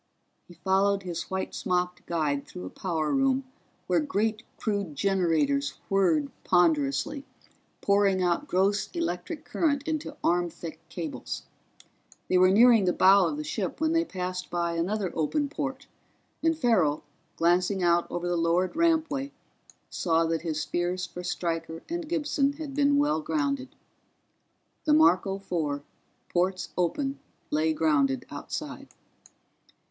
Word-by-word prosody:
He 175 - -14
followed 195 +3 +1
his 175 -2 -5
white 190 0 -3
smocked 180 -1 -2
guide 150 -4 -1
through 90 - -8
a 90 - -7
power 160 -5 -2
room 270 0 +2 0.4
where - - +2
great 220 -7 0 0.2
crude 200 -8 -2
generators 150 -6 +1
whirred 170 -7 +2
ponderously, 160 - +2 0.6
pouring 200 -2 +3
out 180 +12 0
gross 195 0 +1
electric 315 - -3
current 285 -4 0
into 310 -2 -3
arm 175 0 +2
thick 165 0 -8
cables. 165 -4 -5 0.9
They 185 - +4
were 185 0 +6
nearing 225 +1 +6
the 180 - +2
bow 190 -1 +6
of 150 -2 -3
the 150 - -3
ship 185 - -3
when 315 0 +1
they 330 0 +3
passed 180 - -4
by 170 -1 -1
another 185 +3 -1
open 285 - 0
port 275 -2 -4 0.6
and 325 0 +2
Farrell, 185 - +2 0.3
glancing 180 +3 +2
out 170 0 +3
over 175 0 -3
the 175 - 0
lowered 170 - +1
rampway, 320 -4 +1 0.6
saw 165 -1 +1
that 165 -1 -1
his 155 -1 -2
fears 175 +3 -1
for 180 +1 -8
Stryker 165 -2 -3
and 340 -2 -4
Gibson 290 -4 +1
had 290 -1 -7
been 285 0 +3
well 295 +2 +2
grounded. 280 -4 -2 1.1
The 300 - +4
Marco 195 - +4
Four, 155 -7 -2 0.4
ports 185 +1 0
open, 270 - -1 0.3
lay 155 +1 +2
grounded 145 -5 +1
outside. - - -6
185 Hz, 135 wpm, -27 LUFS, 165-270 Hz, 1.1 s, were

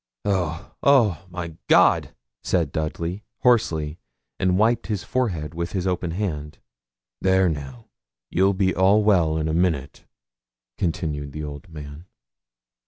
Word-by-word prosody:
'Oh, 90 -5 -1
oh, 105 - +3
my 85 -2 -6
God!' - - +4 0.3
said 85 -6 +1
Dudley, 85 +6 -3 0.2
hoarsely, 80 -11 +2 0.4
and 90 0 +2
wiped 115 +3 +2
his 105 -5 -2
forehead 85 - -2
with 85 +1 -4
his 95 -2 -1
open 90 -2 -1
hand. 80 -5 -3 0.6
'There 95 0 +4
now, 70 -6 -6 0.5
you'll 95 +2 +3
be 95 -1 +2
all 100 +3 +4
well 85 -7 +3
in 80 0 -1
a 80 - -1
minute,' 80 -6 -1 0.7
continued 75 -5 -2
the 75 - -5
old 75 +5 -8
man. 75 +1 -9
85 Hz, 130 wpm, -23 LUFS, 75-95 Hz, 0.7 s, God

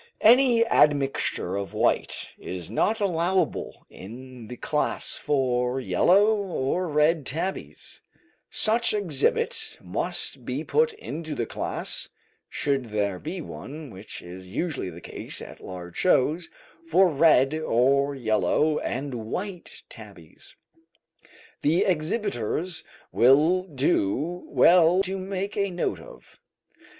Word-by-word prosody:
Any 240 0 +6
admixture 140 - +2
of 100 0 -4
white - - 0
is 90 0 -6
not 215 - +1
allowable 185 -1 -1
in 125 +3 -11
the 125 - -8
class 150 -1 -1
for 125 -2 0
yellow 200 - +4
or 180 -3 -1
red 150 +1 +2
tabbies; 165 +8 -5 0.5
such 225 0 +2
exhibit 175 -10 0
must 130 - -3
be 130 +5 -3
put 465 - +2
into 160 - -6
the 115 - -1
class - - -2 0.4
(should 140 -3 -1
there 100 -4 -2
be 175 +4 -5
one, 150 -2 -8
which 95 +2 -9
is 90 +1 -10
usually 135 - -3
the 85 0 -11
case - - -4
at - - -10
large 90 -2 -8
shows) 165 0 +2 0.4
for 180 +4 +5
red 145 -3 +4
or 140 -1 +2
yellow 120 - +1
and 135 +2 -3
white 175 - -6
tabbies. - - -14 1.1
This 160 +4 +3
exhibitors 165 - -1 0.3
will 150 +9 +5
do 150 - 0
well 175 +2 +5
to 190 0 -3
make 195 +1 -4
a 200 -1 0
note 175 -1 -2
of. - - -15
150 Hz, 115 wpm, -25 LUFS, 125-185 Hz, 1.1 s, Any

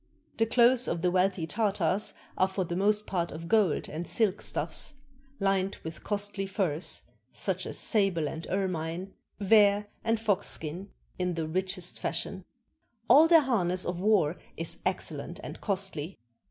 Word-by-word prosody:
The 225 - +2
clothes 245 +2 +4
of 170 0 -2
the 180 - +3
wealthy 185 -2 +1
Tartars 200 0 0 0.2
are 185 - +3
for 190 0 -2
the 175 0 -4
most 210 +3 +2
part 175 -3 -2
of 165 +2 -7
gold 205 -6 +2
and 165 +3 -5
silk 215 -4 +1
stuffs, 300 - -2 0.4
Hned 195 -1 +1
with 160 0 -7
costly 205 -1 -2
furs, 185 -5 -1 0.3
such - - -2
as - - -4
sable 195 -8 +2
and 160 +3 -6
ermine, 185 -1 -2 0.3
vair, 205 0 +4
and 225 0 +1
fox 205 -3 +1
skin, 170 +6 -4 0.3
in 180 -1 0
the 160 -1 -2
richest 185 +1 -1
fashion. 180 +3 -3 0.6
All 310 +3 +8
their 330 -1 +7
harness 185 -9 +1
of 175 0 -3
war 185 -5 +3 0.2
is - - +1
excellent - - -4
and - - -8
costly. 190 -4 -2
190 Hz, 155 wpm, -29 LUFS, 175-210 Hz, 0.6 s, All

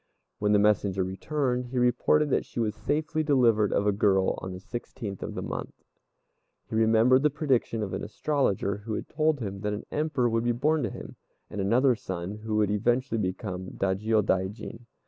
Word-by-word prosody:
When 105 0 +1
the 105 - +5
messenger 100 -2 +2
returned, 125 +6 -1
he 125 +1 -5
reported 125 +4 +3
that - - +2
she - - -7
was 110 -2 0
safely 155 +5 -1
delivered 120 -8 +3
of 100 - +1
a 105 - +4
girl 95 -2 +2
on 95 - -5
the 90 - -7
sixteenth 100 -2 -7
of - - -5
the - - -4
month. - - -5 0.9
He - - -10
remembered 115 +3 +4
the 150 - +4
prediction 135 -7 0
of 95 - -4
an - - -3
astrologer 105 -6 0
who 105 +1 -5
had - - -5
told 155 -2 +1
him 100 -3 -4
that 105 +1 -2
an 105 - -5
Emperor 150 -5 0
would 115 0 0
be 120 0 +2
born 150 +6 +1
to - - -1
him, - - -9 0.3
and 105 - -3
another 125 +7 +4
son 95 -4 -5
who 110 0 -4
would 105 -1 +2
eventually 120 +3 +1
become 95 -1 -4
a - - -8
Dajiôdaijin. 105 +3 -1
110 Hz, 190 wpm, -27 LUFS, 100-130 Hz, 0.9 s, the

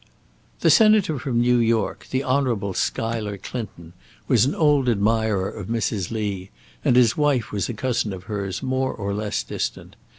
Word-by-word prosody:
The - - +5
Senator 215 - +4
from 120 -1 -1
New 120 0 +3
York, 115 -1 0
the 130 +1 -1
Honourable 125 -8 0
Schuyler 110 0 -2
Clinton, 95 -6 -7 0.3
was 115 -1 +4
an 140 - -1
old 145 -5 +3
admirer 110 -2 +1
of - - -7
Mrs. 110 -5 -1
Lee, 100 -4 -3 0.3
and 120 - +3
his 120 -3 +5
wife 145 -6 +1
was 100 -4 -2
a 120 - -4
cousin 120 -2 -1
of 95 -1 -7
hers, 100 -1 -4
more 130 0 0
or 100 -2 -4
less 105 0 -2
distant. - - -5
115 Hz, 165 wpm, -23 LUFS, 100-130 Hz, 0.3 s, The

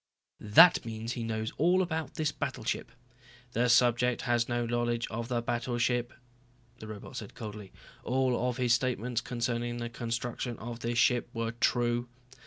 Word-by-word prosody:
"That 165 +13 +7
means 115 0 -5
he 120 - -4
knows 110 -1 -3
all 180 +4 +4
about 160 -3 -3
this 155 -1 0
battleship." - - -3 0.6
"The 120 +1 +1
subject 120 0 +3
has 120 -1 +1
no 120 0 0
knowledge 120 0 0
of 115 +1 -3
the 120 -2 -1
battleship," 120 0 0 0.7
the 110 - -9
robot 110 +4 -8
said 105 - -7
coldly. 105 -3 -8 0.3
"All 125 -1 +1
of 125 - -3
his 125 -2 +3
statements 125 -1 0
concerning 120 0 -2
the 120 0 -4
construction 120 0 -3
of 115 +1 -7
this 115 0 -2
ship 125 -1 +3
were 115 0 -1
true." 120 0 +1
120 Hz, 155 wpm, -30 LUFS, 115-125 Hz, 0.7 s, That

